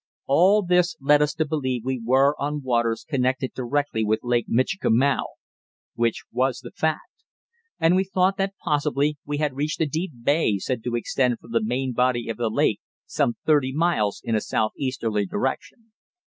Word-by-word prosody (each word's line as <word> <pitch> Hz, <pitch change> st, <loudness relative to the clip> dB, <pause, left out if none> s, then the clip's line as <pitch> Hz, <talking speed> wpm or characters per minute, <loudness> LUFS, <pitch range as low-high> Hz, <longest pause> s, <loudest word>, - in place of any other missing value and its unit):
All 190 Hz, +9 st, +4 dB
this 180 Hz, 0 st, +2 dB
led 145 Hz, +2 st, +4 dB
us 150 Hz, 0 st, +1 dB
to 160 Hz, -, 0 dB
believe 130 Hz, -6 st, -2 dB
we 130 Hz, -2 st, -2 dB
were 135 Hz, +4 st, +4 dB
on 145 Hz, 0 st, -3 dB
waters 120 Hz, -3 st, 0 dB
connected 130 Hz, -1 st, 0 dB
directly 130 Hz, -2 st, -1 dB
with 110 Hz, +1 st, 0 dB
Lake 120 Hz, -1 st, 0 dB
Michikamau 130 Hz, 0 st, +2 dB, 0.7 s
(which 115 Hz, -1 st, -1 dB
was 130 Hz, -1 st, 0 dB
the 120 Hz, -, -10 dB
fact), 160 Hz, -1 st, -3 dB, 0.6 s
and 165 Hz, +2 st, +4 dB
we 190 Hz, -, +3 dB
thought 190 Hz, 0 st, +1 dB
that 195 Hz, 0 st, -1 dB
possibly 150 Hz, 0 st, 0 dB
we 145 Hz, 0 st, -2 dB
had 150 Hz, -2 st, 0 dB
reached 150 Hz, +2 st, -2 dB
a 160 Hz, -, +2 dB
deep 160 Hz, +6 st, -3 dB
bay 140 Hz, -7 st, +2 dB
said 115 Hz, +4 st, -3 dB
to 120 Hz, -1 st, -1 dB
extend 125 Hz, +1 st, 0 dB
from 115 Hz, -, -16 dB
the 115 Hz, -1 st, +1 dB
main 125 Hz, +3 st, -1 dB
body 125 Hz, -1 st, +1 dB
of 115 Hz, -, -3 dB
the 120 Hz, -2 st, 0 dB
lake -, -, +1 dB, 0.3 s
some 120 Hz, -, 0 dB
thirty 145 Hz, -4 st, +3 dB
miles 135 Hz, -10 st, 0 dB
in 115 Hz, -, -2 dB
a 110 Hz, -, +2 dB
southeasterly 110 Hz, -3 st, -1 dB
direction. 175 Hz, -, -4 dB
130 Hz, 175 wpm, -24 LUFS, 120-150 Hz, 0.7 s, All